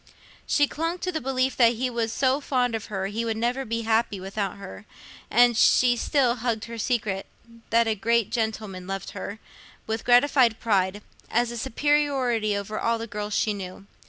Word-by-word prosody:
She 290 Hz, -, +4 dB
clung 330 Hz, +4 st, -3 dB
to 365 Hz, 0 st, -3 dB
the 315 Hz, -, -3 dB
belief 260 Hz, 0 st, 0 dB
that 235 Hz, -2 st, +5 dB
he 255 Hz, +3 st, -1 dB
was 235 Hz, -2 st, -2 dB
so 265 Hz, +3 st, +1 dB
fond 250 Hz, -4 st, 0 dB
of 225 Hz, -2 st, -3 dB
her, 195 Hz, -2 st, -3 dB
he 210 Hz, +4 st, -3 dB
would 225 Hz, -1 st, -2 dB
never 245 Hz, +4 st, -1 dB
be 230 Hz, +1 st, -2 dB
happy 220 Hz, -2 st, +1 dB
without 195 Hz, +1 st, -4 dB
her; 200 Hz, +1 st, -10 dB, 0.4 s
and 240 Hz, +1 st, +5 dB
she 245 Hz, +2 st, +5 dB
still 250 Hz, 0 st, +1 dB
hugged 225 Hz, -2 st, -2 dB
her 230 Hz, 0 st, -8 dB
secret—that 230 Hz, +1 st, -2 dB
a 220 Hz, -, +2 dB
great 230 Hz, +2 st, +1 dB
gentleman 215 Hz, -5 st, -3 dB
loved 195 Hz, -1 st, -5 dB
her—with 220 Hz, +1 st, -8 dB
gratified 245 Hz, -2 st, +4 dB
pride, 200 Hz, -2 st, 0 dB, 0.3 s
as 240 Hz, +1 st, +1 dB
a -, -, -6 dB
superiority 265 Hz, -5 st, +1 dB
over 200 Hz, +2 st, -4 dB
all 230 Hz, 0 st, +1 dB
the 230 Hz, -, -5 dB
girls 210 Hz, -1 st, -4 dB
she 215 Hz, -, +1 dB
knew. 195 Hz, 0 st, -8 dB
230 Hz, 175 wpm, -25 LUFS, 210-250 Hz, 0.4 s, that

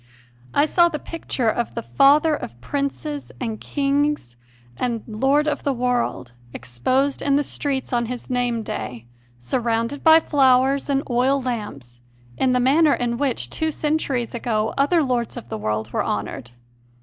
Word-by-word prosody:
I 290 Hz, -, +3 dB
saw 345 Hz, +2 st, +4 dB
the 310 Hz, -, -3 dB
picture 295 Hz, -6 st, -3 dB
of 235 Hz, +2 st, -1 dB
the 230 Hz, -, -3 dB
"Father 295 Hz, +5 st, +4 dB
of 120 Hz, -, -6 dB
princes 285 Hz, -, -4 dB
and 225 Hz, -4 st, -4 dB
kings 285 Hz, -, -1 dB, 0.4 s
and 230 Hz, -, -2 dB
Lord 270 Hz, +7 st, +1 dB
of 295 Hz, -1 st, -1 dB
the 280 Hz, -, 0 dB
world" 245 Hz, -, -1 dB, 0.2 s
exposed 255 Hz, -, 0 dB
in 280 Hz, -1 st, +2 dB
the 290 Hz, -, +2 dB
streets 275 Hz, -3 st, -3 dB
on 235 Hz, -1 st, +1 dB
his 250 Hz, 0 st, -6 dB
name 245 Hz, -2 st, -1 dB
day, 120 Hz, -, -6 dB, 0.3 s
surrounded 230 Hz, -, -1 dB
by 320 Hz, 0 st, +8 dB
flowers 270 Hz, -2 st, +3 dB
and 275 Hz, 0 st, +1 dB
oil 255 Hz, +3 st, +2 dB
lamps, 205 Hz, -, -5 dB, 0.3 s
in 260 Hz, -, +1 dB
the 250 Hz, -, +2 dB
manner 285 Hz, +5 st, +4 dB
in 240 Hz, -1 st, -2 dB
which, 245 Hz, -, -1 dB
two 315 Hz, -, -1 dB
centuries 290 Hz, -6 st, -1 dB
ago, 220 Hz, -2 st, -1 dB
other 305 Hz, +4 st, +3 dB
lords 245 Hz, -3 st, -1 dB
of 120 Hz, -, -9 dB
the -, -, -4 dB
world 110 Hz, +1 st, -2 dB
were -, -, +1 dB
honoured. 105 Hz, +4 st, -4 dB
255 Hz, 160 wpm, -22 LUFS, 225-285 Hz, 0.4 s, by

